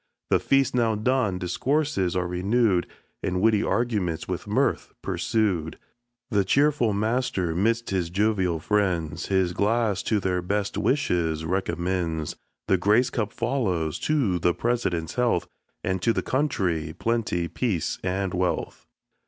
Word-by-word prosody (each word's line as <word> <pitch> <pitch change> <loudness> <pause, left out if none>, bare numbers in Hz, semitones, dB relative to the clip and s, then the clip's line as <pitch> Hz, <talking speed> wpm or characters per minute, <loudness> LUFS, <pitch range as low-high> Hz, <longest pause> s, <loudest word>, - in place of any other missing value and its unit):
The - - +5
feast 135 -1 +2
now 115 -3 +2
done, 110 -3 +1
discourses 100 - 0
are 90 -1 0
renewed, 95 +2 +1 0.3
And 90 0 -1
witty 110 +1 +3
arguments 105 -10 -1
with - - -4
mirth - - 0
pursued; 95 -8 0 0.5
The 100 -2 +3
cheerful 140 -1 +3
master, 105 -4 0
'midst 115 +6 0
his 90 -3 0
jovial 95 -3 +1
friends, 85 -4 0
His 95 -2 +1
glass 105 0 +1
to 110 - +1
their 90 -2 0
best 100 +3 -1
wishes 85 - 0
recommends. 85 -3 -1 0.3
The 95 - +3
grace 105 +7 +3
cup 110 -3 -2
follows: 105 - -1
To 125 -13 +1
the 85 +1 +2
President's 100 -9 -1
health 120 -8 +1 0.4
And 95 -1 -1
to 115 - +2
the - - -1
country; 90 - -1
Plenty, 110 -7 0
Peace, 90 0 -2
and 95 0 -1
Wealth! 90 -1 -2
100 Hz, 135 wpm, -25 LUFS, 90-115 Hz, 0.5 s, The